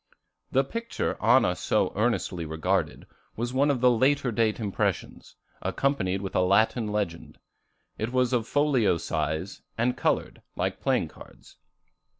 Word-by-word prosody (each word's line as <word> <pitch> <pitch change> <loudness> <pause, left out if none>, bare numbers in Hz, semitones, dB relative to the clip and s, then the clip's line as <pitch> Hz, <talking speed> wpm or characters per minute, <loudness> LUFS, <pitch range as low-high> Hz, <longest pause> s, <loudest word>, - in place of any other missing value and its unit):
The 135 - +3
picture 230 - -3
Anna 115 -4 +4
so - - 0
earnestly 100 -5 0
regarded, 80 0 -1 0.3
was 120 +2 -3
one 140 +3 +3
of 135 -4 0
the 125 -1 +6
later 130 +2 +2
date 110 -1 +1
impressions, 105 -4 -3 0.3
accompanied 100 -9 0
with 95 - -5
a - - +4
Latin 110 +5 +2
legend. 105 -6 -3 0.6
It 110 +2 -2
was 125 0 +1
of 115 -2 0
folio 140 - +2
size, 80 +3 -3 0.2
and 125 +2 +1
colored, 120 - -1
like - - -2
playing - - +1
cards. - - -16
115 Hz, 140 wpm, -27 LUFS, 95-130 Hz, 0.6 s, the